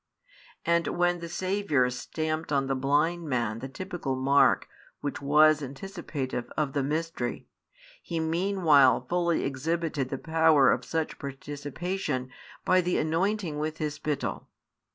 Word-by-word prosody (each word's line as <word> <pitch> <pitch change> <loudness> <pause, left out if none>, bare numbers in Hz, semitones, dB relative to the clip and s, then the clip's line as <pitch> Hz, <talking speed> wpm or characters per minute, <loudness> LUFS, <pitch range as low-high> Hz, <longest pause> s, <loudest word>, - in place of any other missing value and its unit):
And 170 0 +2
when 175 0 +2
the 170 0 -7
Saviour 185 -7 +1
stamped 155 +5 -3
on 140 -1 +2
the 135 - 0
blind 150 +5 +1
man 120 -4 -1
the 135 +3 -6
typical 170 -3 -4
mark 135 +1 +3 0.3
which 145 -1 -4
was 150 +2 +5
anticipative 140 -4 -5
of 145 -3 0
the 140 - +1
mystery, 150 -3 -2 0.6
He 170 -2 -3
meanwhile 160 -5 +3
fully 170 -1 +1
exhibited 150 0 -2
the 135 - -3
power 160 -2 +4
of - - 0
such 160 -1 -2
participation 145 +1 -4 0.3
by 185 0 +4
the 180 0 0
anointing 165 0 0
with 155 +1 -3
His 150 -2 -2
spittle. 150 -1 -3
155 Hz, 135 wpm, -28 LUFS, 135-170 Hz, 0.6 s, was